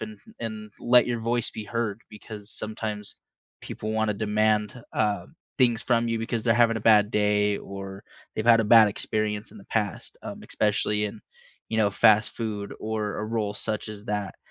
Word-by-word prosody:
and 110 -1 -7 0.2
and 110 -2 -5
let 125 +1 +5
your 120 -1 -1
voice 115 +1 0
be 110 - -7
heard, 115 -1 -3
because 105 -1 -9
sometimes 110 -1 -4 0.4
people 110 +1 -5
wanna 110 -1 +1
demand, 105 +2 +1
uh, 105 -2 0 0.3
things 120 -4 +3
from 120 -1 +2
you 115 - 0
because 115 0 -3
they're 115 -2 +4
having 115 -1 +4
a - - -3
bad 105 -1 +5
day 105 -1 +2
or 95 0 -8 0.3
they've 110 - -2
had 115 -1 +7
a - - 0
bad 110 +1 +8
experience 105 +1 -2
in - - -13
the 100 - -14
past, 105 -5 -3
um, - - -7
especially 105 0 +1
in, 105 +1 -5 0.5
you 110 - -2
know, 105 -2 +3
fast 105 +2 +4
food 105 -3 -4
or 110 -1 -3
a 105 - -3
role 110 -2 -1
such 110 0 -2
as 105 -1 -8
that, 105 -3 -3
110 Hz, 180 wpm, -26 LUFS, 105-115 Hz, 0.5 s, bad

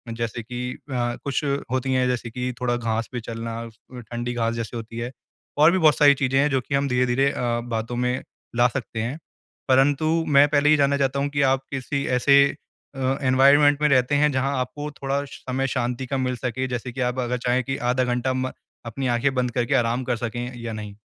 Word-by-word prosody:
जैसे 115 0 -4
कि 125 +2 -5
अ, 125 -3 -3
कुछ 140 +1 -1 0.3
होती 130 0 0
है 130 0 +2
जैसे 125 -2 -2
कि 125 +2 -3
थोड़ा 120 -1 +1
घास 115 -1 -2
पे 125 - -3
चलना, 115 0 -5
अ, 115 +2 -12
ठंडी 120 +1 -5
घास 115 -1 0
जैसे 115 +1 -5
होती 115 0 -8
है, 120 +1 -4 0.5
और 155 +3 +6
भी 190 - +2
बहुत 155 -4 +5
सारी 145 -1 +7
चीज़ें 135 0 +1
हैं 150 +1 +3
जो 135 -2 +1
कि 140 - -3
हम 140 0 +1
धीरे-धीरे 125 +2 +2
अ, 120 -1 -1
बातों 115 0 -3
में 125 +1 -1 0.3
ला 120 +1 +5
सकते 120 -2 -4
हैं। 120 +6 -3 0.5
परंतु 135 +3 +3 0.2
मैं 145 0 +6
पहले 150 0 +3
ये 155 - +6
जानना 140 0 +2
चाहता 140 0 0
हूँ 140 +1 0
कि 145 0 -1
आप 135 - -2
किसी 140 +1 -2
ऐसे 140 +2 +6 0.5
अ, 135 0 0
एनवायरनमेंट 140 +3 +5
में 150 - +4
रहते 130 +1 +3
हैं 150 +1 +3
जहाँ 135 +1 0
आपको 135 +4 -4
थोड़ा 140 +1 -1
समय 135 -1 -3
शांति 125 0 -2
का 135 +2 -2
मिल 125 -1 -1
सके 130 +1 -2
जैसे 125 0 -4
कि 130 +2 -5
आप 125 - -6
अगर 125 0 -1
चाहें 125 +1 0
कि 135 +1 -3 0.2
आधा 130 - +1
घंटा 125 +1 0
म 130 0 -2 0.3
अपनी 125 +3 -3
आँखें 125 +3 +1
बंद 125 -1 0
करके 120 +3 -1
आराम 120 0 +1
कर 120 -1 -1
सकें 120 +2 -4
या 115 -1 -4
नहीं? 105 -2 -7
125 Hz, 215 wpm, -23 LUFS, 120-140 Hz, 0.5 s, सारी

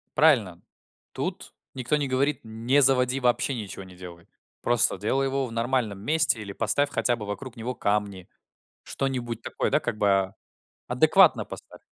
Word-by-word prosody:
Правильно. 115 - +3 0.5
Тут - - -5 0.2
никто 130 +3 0
не 145 -2 -1
говорит: 135 +2 0
не 115 +6 +1
заводи, 130 0 +3
вообще 125 +2 +1
ничего 100 -4 -7
не 95 -1 -14
делай. 85 -2 -11 0.4
Просто 120 -5 +2
делай 130 +7 0
его 135 0 -1
в 115 - -9
нормальном 115 -3 -1
месте 150 -1 +2
или 100 -2 -7
поставь 115 +8 0
хотя 120 -3 0
бы 105 -3 -7
вокруг 120 +5 -6
него 120 +3 -4
камни. 100 -3 -2 0.6
Что-нибудь 125 -4 -3
такое, - - -2
да, - - +3
как - - -4
бы. 95 -2 +2 0.6
Адекватно - - +5
поставь. - - -12
120 Hz, 155 wpm, -26 LUFS, 105-135 Hz, 0.6 s, Адекватно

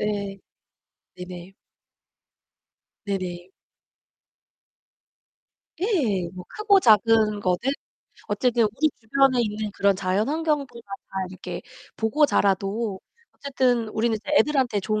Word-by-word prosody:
예. 200 -2 -2 0.8
네네. 180 +1 -9 1.5
네네. 185 -3 -4 2.3
예. 255 - 0
뭐 180 - -8
크고 415 -2 +3
작은 215 - +4
거는 180 -3 +1 0.7
어쨌든 235 +3 +2
우리 260 +9 +1
주변에 260 +2 +3
있는 210 -1 -3
그런 200 0 +2
자연환경들 275 - -1
막 195 0 -6 0.2
다 - - -1
이렇게 180 -1 -7 0.3
보고 260 +7 +3
자라도 200 -2 0 0.4
어쨌든 255 -4 +1
우리는 225 +1 0 0.2
애들한테 265 -9 +2
좋은 215 +2 -1
215 Hz, 210 characters per minute, -24 LUFS, 195-255 Hz, 2.3 s, 작은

